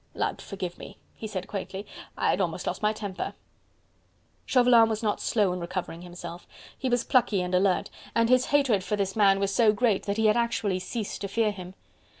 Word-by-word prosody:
"Lud - - -2
forgive 185 -3 -6
me!" 195 - -10 0.2
he 220 - -7
said 185 -3 -5
quaintly, 195 0 -5 0.3
"I - - +2
had - - 0
almost - - -2
lost - - -3
my 210 0 +3
temper." 205 -3 -5 1.1
Chauvelin 245 -3 +5
was 220 +1 -2
not 210 -1 0
slow 205 -6 +1
in 180 - -4
recovering 170 -1 -5
himself. 175 -1 -9 0.3
He 260 - -2
was 245 -1 +1
plucky 215 -7 +2
and 180 0 -4
alert, 185 0 +2 0.2
and 230 0 +3
his 255 +1 +4
hatred 265 -9 +2
for 210 - -1
this 195 -2 -2
man 195 -2 +4
was 195 0 0
so 220 0 +5
great 215 -2 +1
that 200 +1 -1
he 220 - +2
had 215 +2 +4
actually 220 -5 0
ceased 210 +3 -5
to 200 - -2
fear 215 +2 +1
him. 185 -2 -9
205 Hz, 200 wpm, -27 LUFS, 190-230 Hz, 1.1 s, Chauvelin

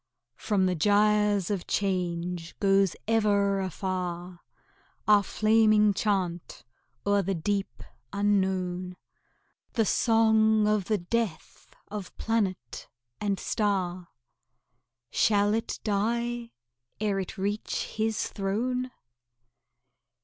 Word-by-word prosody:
From 200 -4 +1
the 185 - +1
gyres 210 +1 +2
of 195 -4 -3
change 180 -3 -2
goes 195 -2 +3
ever 205 -3 +2
afar 180 -1 -4 0.7
Our 210 -1 +6
flaming 215 0 +3
chant 185 - -2 0.4
o'er 205 0 +3
the 195 0 -1
deep 195 +4 -2 0.3
unknown, 190 -3 0 0.8
The 225 -3 +2
song 220 -1 +3
of 210 -3 +1
the 215 +1 +1
death 195 -2 -4
of 205 -2 -7
planet 195 - -2 0.3
and 200 -2 -1
star. 185 -4 -1 1.0
Shall 205 -1 +3
it 225 +1 -2
die 235 +3 -1 0.5
ere 205 -2 0
it 190 +3 -5
reach 205 +3 -2
His 220 0 0
throne? 245 +6 -2
200 Hz, 95 wpm, -27 LUFS, 185-215 Hz, 1.0 s, Our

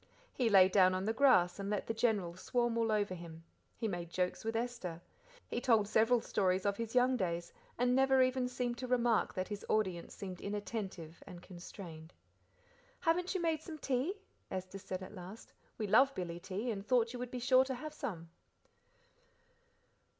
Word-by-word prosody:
He 245 -3 +1
lay 190 -3 +8
down 185 -1 +4
on 185 +1 -2
the 220 - +1
grass 205 -9 +4
and 200 0 -3
let 210 -1 -1
the 225 - -2
General 210 -7 0
swarm 240 +4 0
all 230 -1 +1
over 205 -3 +1
him; 165 -2 -9 0.3
he 230 - -1
made 175 -4 -4
jokes 180 +1 -1
with 225 +1 -2
Esther; 230 -8 -3 0.5
he 240 - -3
told 225 -5 +3
several 225 +3 +3
stories 185 -2 0
of 200 0 +1
his 230 +1 -4
young 250 +1 +4
days, 175 -4 -2 0.2
and 245 +1 +2
never 265 0 +5
even 255 0 +1
seemed 245 -1 -3
to 255 - -4
remark 240 -2 +2
that 185 -1 -2
his 205 -1 -5
audience 185 -6 0
seemed 185 -4 -7
inattentive 200 -5 -5
and 175 -1 -10
constrained. 175 -3 -10 0.9
"Haven't 355 +3 +1
you 370 - 0
made 320 -2 +1
some 315 -1 -8
tea?" 275 +6 -1 0.3
Esther 185 +1 -5
said 190 -1 -5
at 185 - -10
last. 190 +3 -10 0.2
"We 220 - -2
love 260 +7 +5
billy 170 -2 -4
tea, 205 +7 -3
and 200 -2 -4
thought 235 +1 +2
you 250 - -6
would 250 0 -4
be 250 - -5
sure 255 +1 +5
to 265 -1 -3
have 300 +5 -7
some?" 185 - -6
215 Hz, 185 wpm, -34 LUFS, 185-250 Hz, 0.9 s, lay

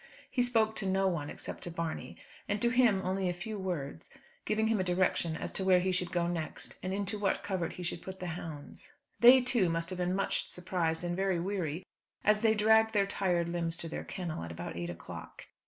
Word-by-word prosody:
He 250 - +2
spoke 225 -3 +3
to 195 - -1
no 190 0 +2
one, 160 -6 -1
except - - -6
to - - -5
Barney, 165 -1 -4 0.3
and 205 +1 +1
to 235 - +3
him 240 -6 +4
only 185 0 0
a - - 0
few 205 +4 -5
words; 160 - -4 0.4
giving 220 +1 +1
him 220 -2 +2
a - - +2
direction 180 -2 +1
as - - -4
to 190 - -2
where 185 -1 +5
he 185 +1 +1
should 180 -1 -1
go 175 -1 +1
next, 170 -2 -4
and 185 - -3
into 200 +2 -2
what 200 -1 0
covert 190 -4 -2
he 180 - -7
should 170 0 -3
put 190 0 -8
the 180 - -5
hounds. 160 - -8 0.3
They, 250 +2 +9
too, 240 -7 +2
must 165 +2 -2
have 185 - -4
been 180 +1 +1
much 195 - -1
surprised 175 -2 -1
and 175 0 -1
very 190 -2 +1
weary, 180 -2 -2 0.4
as 210 0 +4
they 220 -1 +4
dragged 220 +1 +5
their 200 -2 +4
tired 180 -4 0
limbs 170 -1 -1
to 170 - -5
their 160 - -5
kennel, 175 - -4
at 85 - -6
about 85 +1 -6
eight 85 0 -3
o'clock. 85 - -9
185 Hz, 220 wpm, -32 LUFS, 170-205 Hz, 0.4 s, They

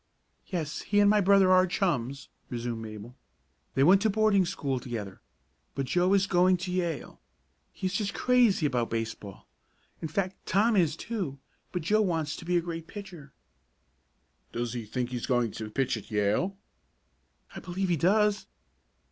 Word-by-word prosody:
"Yes, 160 -6 -3
he 205 0 +1
and 205 - +6
my 210 -1 +4
brother 195 -1 +5
are 185 0 +5
chums," 140 - -1 0.2
resumed 120 -2 -4
Mabel. 110 +2 -9 0.6
"They 135 - +4
went 190 +6 +6
to 220 - +3
boarding 210 -2 +3
school 140 -8 -2
together, 110 -6 -6 0.5
but 135 - -1
Joe 180 +7 +2
is 195 -1 +3
going 185 0 +3
to 180 +1 -5
Yale. 170 -6 -3 0.5
He - - -7
is 185 - -1
just 200 +1 -2
crazy 245 -9 +3
about 125 -5 0
baseball 110 -3 -5 0.5
in 160 - -2
fact 185 +4 -3
Tom 215 +4 +3
is, 165 -6 +3
too, 185 -10 -4 0.3
but 180 -3 -3
Joe 215 +6 +3
wants 165 -6 -1
to - - -10
be 175 +1 +2
a - - +2
great 165 -1 -6
pitcher." 180 -9 -10 1.2
"Does 120 0 -3
he 120 -3 -5
think 125 +3 -3
he's 125 -2 -4
going 120 -4 +1
to 110 +1 -6
pitch 135 +3 0
at 110 - -9
Yale?" 105 - 0 1.0
"I - - -5
believe 185 +1 -3
he 175 - +3
does!" 205 +6 +2
170 Hz, 165 wpm, -28 LUFS, 125-195 Hz, 1.2 s, and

